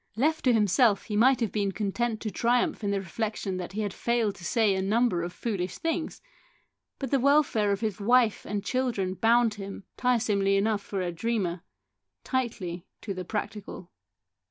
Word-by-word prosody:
Left 310 +7 +1
to 255 - +6
himself 215 0 +3
he 210 - -4
might 255 +4 +4
have 225 - 0
been 200 -2 0
content 220 +3 -2
to 215 - -3
triumph 235 +3 +1
in 205 - 0
the 200 0 +1
reflection 195 0 -3
that 180 +1 -6
he 215 - -2
had 205 -2 -2
failed 235 -3 0
to 175 - -13
say 220 +1 +2
a 190 - -1
number 210 -1 +2
of 175 +1 -4
foolish 185 -4 -3
things, 330 +5 -3 0.7
but 270 -3 -5
the 275 - +3
welfare 265 -6 +3
of 200 - -1
his 215 -2 -2
wife 235 +1 +3
and 205 0 -4
children 235 -8 -1
bound 230 +2 +3
him, 200 -1 -8
tiresomely 215 -6 +2
enough 210 +1 +1
for 200 -1 -4
a 175 -1 -2
dreamer, 185 -2 -2 0.6
tightly 200 -9 -3
to 200 - -4
the 185 -1 -5
practical. 205 -3 -5
210 Hz, 180 wpm, -27 LUFS, 195-240 Hz, 0.7 s, to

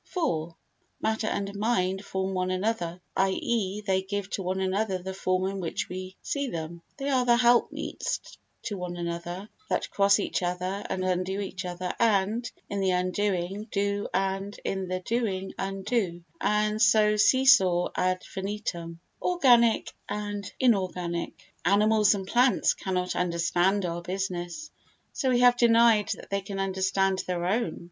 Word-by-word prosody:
iv 165 - -1 0.4
Matter 220 0 -1
and 200 -1 -2
mind 195 -3 0
form 190 -1 -2
one 185 0 -1
another, 185 -2 -1 0.2
i.e. 195 +1 0
they 190 -2 +1
give 200 +1 -4
to - - -2
one 185 +1 -2
another 190 +1 0
the 190 +1 -6
form 185 -1 0
in 195 0 -3
which 170 -3 -3
we 185 +1 -7
see 280 -1 -2
them. 170 -4 -5 0.2
They 275 0 -4
are 260 -2 +3
the 240 -1 +4
helpmeets 240 0 +1 0.4
to 205 - -4
one 175 -1 -5
another 175 +3 -4 0.2
that - - -1
cross 200 0 +4
each 205 - -1
other 180 +3 -2
and 190 -1 -2
undo 185 +1 -1
each 190 -1 -5
other 180 0 -4
and, 225 +1 +2 0.2
in 200 - -3
the 190 -1 +1
undoing, 185 +2 -1
do 200 0 0
and, 195 +1 -2
in 190 -1 -2
the 185 0 -3
doing, 195 -3 -2
undo, 195 -2 -2 0.2
and 210 +1 +1
so 215 -1 +5
see 260 +5 +4
saw 185 -10 +5
ad 185 0 0
infinitum. 190 -4 -5 0.2
Organic 245 -10 +4 0.2
and 205 -1 -4
Inorganic 180 -7 -1
Animals 210 +2 +4
and 195 -1 -4
plants 245 +5 +3
cannot 185 -2 -2
understand 180 +3 +1
our 170 0 -3
business, 185 - -4 0.4
so 265 - 0
we 245 -1 +3
have 245 0 +6
denied 230 -3 +5
that - - -13
they 200 0 0
can 195 0 -6
understand 190 0 +1
their 175 -1 -1
own. 195 -2 0
195 Hz, 155 wpm, -27 LUFS, 185-215 Hz, 0.4 s, have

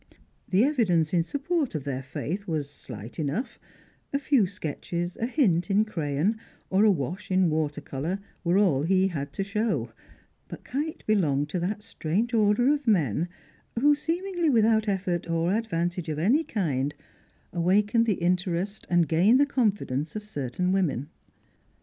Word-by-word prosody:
The 195 +4 +4
evidence 190 - +2
in 175 - +4
support 285 - -1
of 150 - -2
their 135 -2 -3
faith 175 +9 -5
was 155 -4 -1
slight 120 - -9
enough; 155 - -2 0.5
a 280 - +1
few 275 -7 +3
sketches, 175 0 -4
a 230 - -2
hint 190 - +2
in 205 +2 +3
crayon, 170 +2 -1 0.3
or 190 +2 +4
a 220 - +6
wash 175 +4 -3
in 185 -3 +3
water 155 -2 -1
colour, 155 +8 -3 0.3
were 175 +2 +2
all 180 -10 +3
he 190 +4 +3
had 140 -5 -4
to 195 - -2
show; 200 - -1 0.6
but - - -9
Kite 300 +5 -4
belonged 150 -9 +1
to 180 - -2
that 205 +4 -3
strange 225 +3 -2
order 225 +5 +4
of 290 -3 -4
men 165 - +2 0.5
who, 295 +4 +5
seemingly 345 +3 -1
without 220 -3 +3
effort 180 -4 -1
or 165 +2 +1
advantage 175 -6 -1
of 155 - -2
any 235 - +3
kind, 145 - -1 0.6
awaken 205 +6 +3
the 220 - +2
interest 180 +3 -1
and 175 -2 +3
gain 185 +10 +4
the 285 - +5
confidence 205 - -1
of 210 - -4
certain 180 - -2
women. 160 -7 0
185 Hz, 155 wpm, -27 LUFS, 160-220 Hz, 0.6 s, a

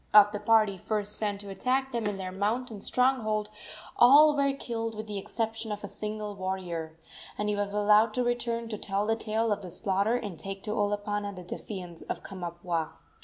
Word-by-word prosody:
Of 205 -1 +9
the 210 - -3
party 210 -2 +3
first 210 +1 -1
sent 205 -2 -1
to 200 - -9
attack 260 +6 0
them 235 -3 -1
in 205 -1 -2
their 185 -1 -4
mountain 215 +3 -2
stronghold 215 -5 +1 0.5
all 295 +5 +8
were 280 -1 +3
killed 230 -4 -4
with 215 +1 -5
the 205 -2 -4
exception 225 +1 -3
of 210 0 -4
a - - -3
single 210 0 -4
warrior, 180 -4 -4 0.4
and 210 0 -1
he 210 - +1
was 205 0 -1
allowed 210 +1 +4
to 250 - +2
return 235 -1 -1
to 215 -2 -4
tell 200 +1 -1
the 225 +1 +2
tale 220 0 0
of 205 0 0
the 185 - -7
slaughter 195 +5 +1
and 205 -9 -4
take 195 +1 -6
to 210 - -2
Olopana 205 -1 -1
the 180 - -8
defiance 180 -1 -7
of - - -5
Kamapuaa. 175 -3 -3
210 Hz, 195 wpm, -29 LUFS, 195-225 Hz, 0.5 s, Of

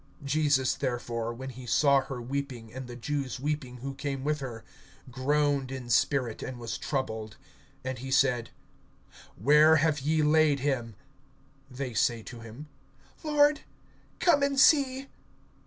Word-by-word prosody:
(33)Jesus 140 -2 +2
therefore, 120 -3 -2
when 130 +3 -7
he 125 0 -10
saw 140 +1 +4
her 135 -2 -6
weeping, 125 -3 -5
and 130 0 -7
the 120 - -8
Jews 135 +1 -3
weeping 140 -3 -3
who 135 - -3
came 135 -1 -4
with 150 +1 0
her, 120 -5 -7 0.5
groaned 140 +1 0
in 130 -3 -6
spirit, 125 -2 +1
and 130 - -6
was 115 -2 -5
troubled. 110 -6 -3 0.5
(34)And 130 0 -3
he 135 +2 -7
said: 130 -3 +2 0.9
Where 150 +2 +6
have 155 -1 +2
ye 155 +3 +1
laid 150 -2 +3
him? 120 -6 -1 0.7
They 130 -1 -5
say 115 0 +1
to 120 - -9
him: 115 +6 -10 0.6
Lord, 295 -1 +3 0.6
come 340 -5 +3
and 280 -1 +1
see. 270 -2 +4
135 Hz, 140 wpm, -28 LUFS, 125-150 Hz, 0.9 s, Where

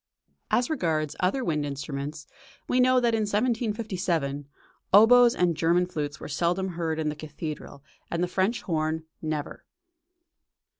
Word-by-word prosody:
As 245 - +2
regards 155 - -1
other 195 +9 +1
wind 150 -2 0
instruments, 140 +1 -5 0.4
we 250 - +1
know 255 0 +5
that 240 -2 +2
in 225 - +1
1757, 205 - -1 0.4
"Oboes 235 +4 +7
and 175 -2 +2
German 170 +3 +2
flutes 150 -5 -4
were - - -7
seldom 175 +5 0
heard 165 -2 -2
in 155 -1 -1
the 150 - -4
cathedral, 150 -2 -7 0.3
and 170 +1 -1
the - - +1
French 190 +6 0
horn, 160 -1 -1 0.2
never." 155 -2 -4
170 Hz, 140 wpm, -27 LUFS, 155-210 Hz, 0.4 s, Oboes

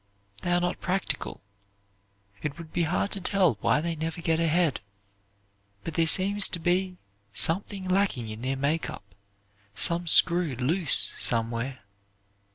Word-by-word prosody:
They 175 - -3
are 175 - +3
not 175 0 -3
practical. 190 +1 -3 1.0
It 145 -2 -5
would 165 -2 -11
be - - 0
hard 190 +3 -1
to 200 - -5
tell 185 - +1
why 150 - +2
they 165 0 -3
never 160 +2 -5
get 165 -1 0
ahead, 165 -2 +1 1.0
but 165 - -6
there 165 -1 +1
seems 200 +4 +5
to 175 - -6
be 180 +2 -1 0.4
something 190 - -1
lacking 185 - 0
in 110 +1 -7
their 135 +2 -2
make 150 +4 -1
up, 155 - -9 0.7
some 170 - 0
screw 170 -2 +5
loose 155 +8 +2
somewhere. 115 +3 -1
165 Hz, 145 wpm, -26 LUFS, 145-180 Hz, 1.0 s, seems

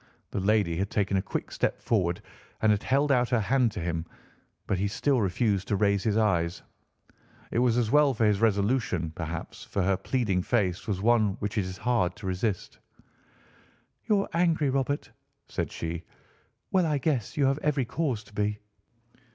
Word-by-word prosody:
The - - -2
lady 100 -4 +2
had 100 +2 -1
taken 100 -1 0
a - - +2
quick 95 - -4
step - - -1
forward 90 -6 0 0.4
and 110 - +5
had 105 0 +1
held 140 +2 +2
out 125 -3 +3
her 120 -2 +2
hand 120 +2 +2
to - - -4
him, 85 -1 -2 0.6
but 95 - -1
he 100 - +1
still 130 +5 +1
refused 100 0 0
to 105 - +1
raise 100 -1 +2
his 110 -1 +2
eyes. 90 -6 +1 0.9
It - - +1
was 120 -1 +3
as 115 -3 +1
well 150 -1 +5
for 110 - +2
his 105 -1 +2
resolution, 100 -5 +1
perhaps, 85 0 -6
for 100 - -2
her 95 +1 +2
pleading 105 -8 0
face 95 -4 0
was 100 -2 -2
one 110 -3 +4
which 105 0 -4
it 95 - 0
was 95 0 -7
hard 95 -6 +1
to 105 - -10
resist. 95 +1 -2 1.3
"You're 210 -3 +2
angry, 165 -4 +2
Robert," 135 +2 -1 0.4
said - - -3
she. 85 0 -4 0.7
"Well, 185 -3 +3
I 150 -2 +1
guess 135 -6 -1
you 140 - +3
have 135 +2 +2
every 150 -4 0
cause 125 -5 -2
to 105 - -20
be." 105 0 0
105 Hz, 180 wpm, -28 LUFS, 95-130 Hz, 1.3 s, and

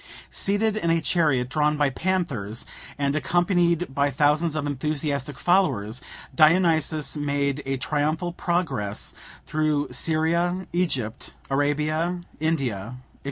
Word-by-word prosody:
Seated 205 +2 +1
in 170 -6 0
a 165 0 +3
chariot 150 -8 +1
drawn 150 +2 +1
by 145 -2 +2
panthers, 135 - -2 0.3
and 140 0 0
accompanied 175 0 +1
by 140 +1 +2
thousands 150 +4 +2
of 150 -2 -1
enthusiastic 145 0 -2
followers, 125 - +1 0.3
Dionysus 160 -2 +3
made 145 -1 -1
a 135 0 0
triumphal 155 +5 -1
progress 140 - -2 0.3
through 150 -2 0
Syria, 170 +6 +1
Egypt, 135 -11 -2 0.2
Arabia, 155 +5 0 0.2
India, 130 -9 -1
&c. 125 - -13
150 Hz, 115 wpm, -25 LUFS, 140-170 Hz, 0.3 s, a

